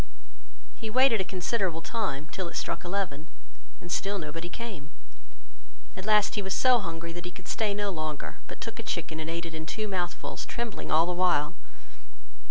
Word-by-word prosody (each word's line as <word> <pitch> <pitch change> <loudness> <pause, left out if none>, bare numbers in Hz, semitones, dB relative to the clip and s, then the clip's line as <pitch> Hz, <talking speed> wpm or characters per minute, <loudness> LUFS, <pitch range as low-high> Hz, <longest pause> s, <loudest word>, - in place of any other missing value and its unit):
He 225 - -4
waited 245 -2 +6
a - - +2
considerable 185 -2 0
time, 170 - -1
till 185 -2 -2
it - - -4
struck 170 - -1
eleven, 175 -5 -1 0.5
and 175 - -8
still 200 +2 +1
nobody 165 0 -4
came: 195 -10 -6 1.1
at 190 +2 -6
last 210 -1 +6
he 210 - +1
was 190 -1 0
so 255 -2 +6
hungry 165 -3 -4
that 175 0 -5
he - - -2
could - - -11
stay 215 -2 +1
no 205 -1 +1
longer, 155 -4 -3
but - - -8
took - - -5
a - - 0
chicken 160 - -2
and 160 0 -3
ate 170 +1 -2
it 165 - -5
in 160 0 -4
two 215 +3 -1
mouthfuls, 180 -3 -2
trembling 235 -2 -3
all 160 +2 +6
the 180 - 0
while. 175 -3 +3
180 Hz, 185 wpm, -30 LUFS, 165-205 Hz, 1.1 s, waited